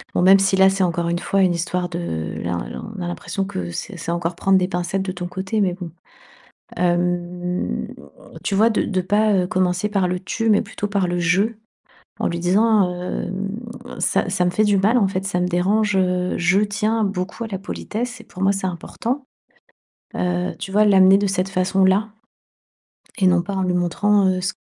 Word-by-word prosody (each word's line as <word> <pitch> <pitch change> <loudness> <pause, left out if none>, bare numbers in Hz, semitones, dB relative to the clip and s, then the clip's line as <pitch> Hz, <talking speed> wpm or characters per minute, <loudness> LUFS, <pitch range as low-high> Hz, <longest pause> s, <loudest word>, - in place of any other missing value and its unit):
bon 175 - +2
même 195 +1 +7
si 195 0 +2
là 190 0 +6
c'est 195 0 0
encore 170 -1 0
une 170 - -1
fois 195 +2 0
une 180 -2 +3
histoire 175 +1 -2
de 170 - -4
là 85 0 -2
là, - - -7 0.2
on - - -5
a 175 - -3
l'impression 195 +3 -3
que 90 - -5
c'est 185 - -6
c'est 170 - -4
encore 170 0 -2
prendre 195 +1 +3
des 180 -1 +1
pincettes 180 +1 -2
de 190 - -3
ton 180 -1 -5
côté, 190 +4 -2
mais 185 -3 +1
bon. 180 -3 -8 0.9
Hem, 175 0 -1 0.6
tu 200 - -1
vois 220 +4 +4
de 220 - +1
de 185 -3 -1
pas, 210 +2 +2
heu, 180 -1 +2
commencer 180 +2 0
par 195 -3 +1
le 180 0 -2
«tu» 225 +4 -1
mais 205 - +4
plutôt 205 - -5
par 200 -3 0
le 175 0 -1
«je», 180 +3 +3 0.8
en - - 0
lui 170 0 -3
disant, 195 +1 +3
hem: 190 +2 -3 0.5
«ça - - +1
ça 185 -1 +1
me - - +2
fait 215 +4 +2
du 205 -1 +3
mal 220 +6 +3
en 200 - +3
fait, 190 0 -3
ça 195 -2 -1
me 180 - +1
dérange, 195 +3 +1
heu, 180 -1 +1
je 180 +2 +3
tiens 215 +2 0
beaucoup 195 +3 -3
à 225 - -5
la 195 - -4
politesse 240 +4 -5
et - - -12
pour 185 - -9
moi 195 - +4
c'est 195 -1 -2
important». 235 - -4 0.9
Heu, 180 0 -1
tu 190 - -6
vois 210 +1 +4
l'amener 195 -1 +6
de 205 - 0
cette 190 0 -1
façon-là? 190 +2 +2 1.1
Et 190 - +3
non 180 -1 +4
pas 200 +1 -4
en 190 - 0
lui 180 -1 0
montrant, 195 +3 +2
heu, 185 0 0
ce 190 +1 -1
190 Hz, 210 wpm, -21 LUFS, 180-200 Hz, 1.1 s, même